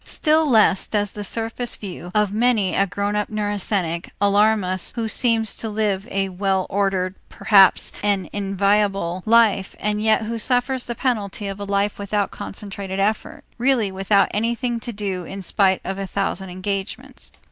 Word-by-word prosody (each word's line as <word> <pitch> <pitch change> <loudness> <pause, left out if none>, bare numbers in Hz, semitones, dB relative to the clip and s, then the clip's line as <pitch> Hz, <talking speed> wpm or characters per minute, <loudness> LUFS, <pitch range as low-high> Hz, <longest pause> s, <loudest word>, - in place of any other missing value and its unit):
Still 310 -1 +2
less 215 -5 +4
does 205 -1 -1
the 210 - -6
surface 225 +3 -3
view 180 -3 -8
of 210 -1 +2
many 220 -5 +2
a 195 - +2
grown 200 +2 -2
up 210 0 -1
neurasthenic 200 -5 -2
alarm 205 +1 +3
us 185 0 -1
who 230 -2 -2
seems 225 -1 +1
to 225 - -3
live 210 -2 -1
a 195 0 -1
well 190 0 0
ordered, 190 -2 0 0.2
perhaps 195 -3 +4
an 200 -2 0
enviable 195 -2 0
life, 220 -4 +3
and 210 0 -1
yet 220 +1 +3
who 230 +1 -4
suffers 250 +2 0
the 240 - -3
penalty 210 -6 -2
of 195 0 -5
a 200 - -4
life 200 +1 0
without 200 0 -1
concentrated 195 -1 -6
effort, 210 +2 -1 0.2
really 240 -5 +2
without 195 +1 +2
anything 235 +2 -1
to 235 - -6
do 200 -4 -4
in 195 +3 -7
spite 190 0 +2
of 190 +1 -4
a 195 - -3
thousand 190 -1 -2
engagements. 190 +2 -5
205 Hz, 165 wpm, -22 LUFS, 195-220 Hz, 0.2 s, less